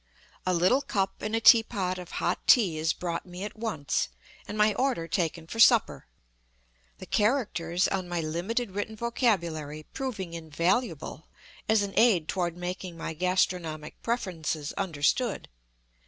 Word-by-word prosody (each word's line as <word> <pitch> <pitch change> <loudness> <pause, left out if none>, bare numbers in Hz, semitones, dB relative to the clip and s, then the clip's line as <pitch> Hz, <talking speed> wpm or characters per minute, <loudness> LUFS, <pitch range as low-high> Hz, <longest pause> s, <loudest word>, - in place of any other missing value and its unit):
A 185 - +3
little 185 +11 +3
cup 195 -8 -2
and 215 +1 -2
a - - +2
teapot 200 -6 +4
of 180 -1 -10
hot - - 0
tea 185 -11 +5
is 160 +1 +2
brought 170 0 -3
me 180 +2 -7
at 210 - -6
once, 200 - -1 0.4
and 210 - -5
my 210 0 +4
order 250 -11 0
taken 165 -1 -1
for 225 +7 -7
supper; 230 - +5 0.9
the - - -9
characters 190 -7 +1
on 185 -2 -2
ray 175 -2 -1
limited 190 +9 -2
written 205 +3 -4
vocabulary 170 - -1
proving 210 -10 -4
invaluable 165 - -2 0.4
as 220 -2 +4
an 200 -1 -4
aid 205 -9 +4
toward 175 -2 -2
making 180 -1 -5
my 165 - -4
g 180 +4 -2
astro 185 0 +2
nomic 155 -2 -7
preferences 165 -10 -2
understood. 195 - 0
185 Hz, 150 wpm, -28 LUFS, 165-220 Hz, 0.9 s, tea